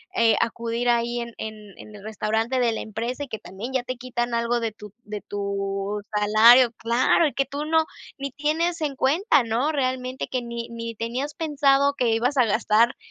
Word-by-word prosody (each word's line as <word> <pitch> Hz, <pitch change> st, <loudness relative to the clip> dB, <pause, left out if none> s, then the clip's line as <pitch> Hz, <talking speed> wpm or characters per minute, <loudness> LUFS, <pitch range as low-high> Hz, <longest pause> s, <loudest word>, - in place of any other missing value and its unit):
eh, 230 Hz, -1 st, +4 dB
acudir 230 Hz, +1 st, -1 dB
ahí 240 Hz, 0 st, +1 dB
en 235 Hz, -, -6 dB
en 220 Hz, 0 st, -5 dB, 0.2 s
en 215 Hz, -, -12 dB
el 200 Hz, -, -12 dB
restaurante 220 Hz, +3 st, -1 dB
de 235 Hz, -2 st, +2 dB
la -, -, -4 dB
empresa, 235 Hz, +6 st, -4 dB
y 280 Hz, -, -8 dB
que 220 Hz, -, -5 dB
también 215 Hz, +7 st, -8 dB
ya 260 Hz, -2 st, 0 dB
te 255 Hz, -, -4 dB
quitan 240 Hz, -1 st, -3 dB
algo 235 Hz, +1 st, +1 dB
de 225 Hz, -2 st, -3 dB
tu 210 Hz, -1 st, -12 dB
de 210 Hz, -1 st, -6 dB
tu 200 Hz, 0 st, -3 dB
salario 225 Hz, +4 st, +6 dB
claro, 235 Hz, +8 st, +3 dB
y 295 Hz, -, -1 dB
que 275 Hz, -, 0 dB
tú 285 Hz, +2 st, -5 dB
no 320 Hz, 0 st, +3 dB, 0.3 s
ni 275 Hz, 0 st, -5 dB
tienes 320 Hz, +5 st, -1 dB
en 285 Hz, -3 st, -2 dB
cuenta, 300 Hz, -, +3 dB
¿no? 240 Hz, +7 st, 0 dB
Realmente 255 Hz, -2 st, -2 dB
que 255 Hz, -, -2 dB
ni 235 Hz, -1 st, -6 dB
ni 230 Hz, 0 st, -6 dB
tenías 250 Hz, +7 st, -4 dB
pensado 280 Hz, -3 st, +2 dB
que 240 Hz, -2 st, +2 dB
ibas 240 Hz, +5 st, +1 dB
a 255 Hz, -, +6 dB
gastar 225 Hz, +2 st, +2 dB
240 Hz, 195 wpm, -24 LUFS, 225-270 Hz, 0.3 s, salario